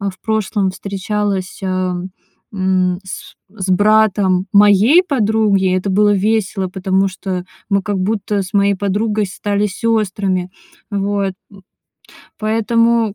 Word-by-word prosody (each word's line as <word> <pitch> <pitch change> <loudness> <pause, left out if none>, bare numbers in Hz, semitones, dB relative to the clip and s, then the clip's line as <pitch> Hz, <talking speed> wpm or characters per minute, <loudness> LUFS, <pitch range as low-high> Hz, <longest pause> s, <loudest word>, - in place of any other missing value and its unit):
э, 200 -1 -2
в 185 - -16
прошлом 210 -3 0
встречалась, 200 0 -3
ам, 185 -1 -2 0.4
м, 185 -2 0
с 185 0 -9
с 190 -2 -6
братом 200 -2 +3
моей 210 - +6
подруги. 215 - +1
Это 185 +2 -2
было 205 +2 +3
весело, 200 -1 0
потому 190 +1 0
что 185 -1 -5 0.2
мы, 200 -1 +2
как 205 -2 -2
будто, 205 0 -1
с 185 - -9
моей 200 0 +3
подругой 205 +2 -1
стали 205 +2 -1
сёстрами. 195 -3 -1 0.4
Вот, 200 -1 -1 0.2
м. 200 - -16 0.8
Поэтому, 225 0 +1
200 Hz, 125 wpm, -17 LUFS, 190-215 Hz, 0.8 s, моей